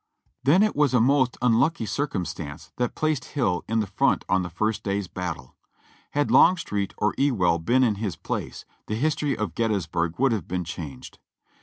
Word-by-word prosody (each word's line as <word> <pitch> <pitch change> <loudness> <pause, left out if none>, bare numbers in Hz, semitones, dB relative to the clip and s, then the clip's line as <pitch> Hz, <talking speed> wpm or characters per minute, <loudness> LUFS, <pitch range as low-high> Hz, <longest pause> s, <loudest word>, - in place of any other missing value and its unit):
Then 160 +10 +5
it 215 - +1
was 145 -3 +3
a - - +5
most 130 +1 +3
unlucky 125 +3 +2
circumstance 85 - -4
that 125 -1 -1
placed 155 -4 0
Hill 100 -11 -1
in 115 +1 +1
the - - -1
front 100 - +1
on 95 0 +2
the 90 - -4
first 110 +5 -1
day's 100 -1 -2
battle. 90 -9 -6 0.6
Had 145 0 +1
Longstreet 105 - +3
or 105 - +1
Ewell 95 -12 +2
been 125 +10 +2
in 115 -4 +3
his 100 -7 -2
place, - - -5 0.2
the 105 - -2
history 145 +2 0
of 105 - -3
Gettysburg 85 -7 -1
would 135 0 +3
have 105 -8 -2
been 90 0 -2
changed. 80 -6 -8
110 Hz, 175 wpm, -25 LUFS, 90-130 Hz, 0.6 s, Then